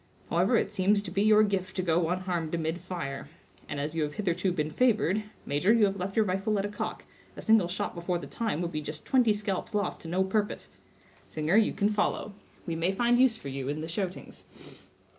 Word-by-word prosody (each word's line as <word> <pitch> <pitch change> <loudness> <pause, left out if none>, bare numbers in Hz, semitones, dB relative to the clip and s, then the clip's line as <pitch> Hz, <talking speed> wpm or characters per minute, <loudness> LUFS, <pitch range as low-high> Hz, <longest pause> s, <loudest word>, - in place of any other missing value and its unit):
However, - - +3
it - - 0
seems 200 0 +2
to 175 - -7
be 195 +2 0
your 215 0 +6
gift 195 -3 -1
to 185 - -1
go 165 -1 +2
unharmed 175 -3 -1
amid 165 +1 -2
fire; 170 -7 -5 0.4
and 145 - -3
as 150 +2 -2
you 165 - -1
have 150 -1 -2
hitherto 185 -2 0
been 155 -3 -2
favored—major, 210 - +1
you 230 -3 +5
have 195 -1 0
left 190 +1 -4
your 220 - +4
rifle 195 +3 0
at 195 - 0
a - - -2
cock; 205 - -5 0.3
a - - -7
single 220 -5 +5
shot 180 +2 -3
before 175 +1 -2
the 175 - -7
time 220 -8 -2
would 170 - -3
be 155 -2 -3
just 150 +1 -7
twenty 250 -4 +4
scalps 210 0 -2
lost 205 - -1
to - - -9
no 180 +3 +1
purpose—singer, 190 -4 -3
you 220 0 +4
can 205 -1 +1
follow; 210 0 -1 0.3
we 165 - -2
may 165 +3 +1
find 240 +4 +2
use 255 -3 +4
for 140 - -7
you 135 -1 -4
in 150 +2 -2
the 160 - -4
shoutings." 185 +2 -5
185 Hz, 215 wpm, -29 LUFS, 165-210 Hz, 0.4 s, your